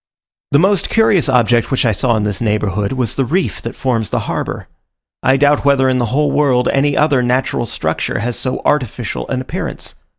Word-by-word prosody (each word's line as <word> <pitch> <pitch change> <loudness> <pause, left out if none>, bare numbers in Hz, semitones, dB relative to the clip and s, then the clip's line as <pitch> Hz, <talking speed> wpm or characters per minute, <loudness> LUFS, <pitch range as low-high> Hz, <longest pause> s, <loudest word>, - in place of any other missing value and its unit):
The 140 - +4
most 190 +5 +2
curious 205 -9 +3
object 120 -2 +2
which 135 - 0
I 115 - +3
saw 120 +4 +1
in 105 - -1
this 105 -3 -2
neighbourhood, 105 -1 -1
was 125 -4 -1
the 135 - 0
reef 175 +9 -1
that - - -6
forms 115 -5 -1
the - - -1
harbour. - - -4 0.5
I 135 +1 +3
doubt 145 +1 +3
whether 140 -2 +3
in 130 -1 +1
the 120 - +1
whole 145 +6 +1
world 130 -4 +2
any 140 +1 +1
other 145 -4 +3
natural 125 -1 0
structure - - -2
has 115 +3 -2
so 130 - -3
artificial 125 - -2
an 130 - -1
appearance. 130 - -6
130 Hz, 195 wpm, -16 LUFS, 115-140 Hz, 0.5 s, The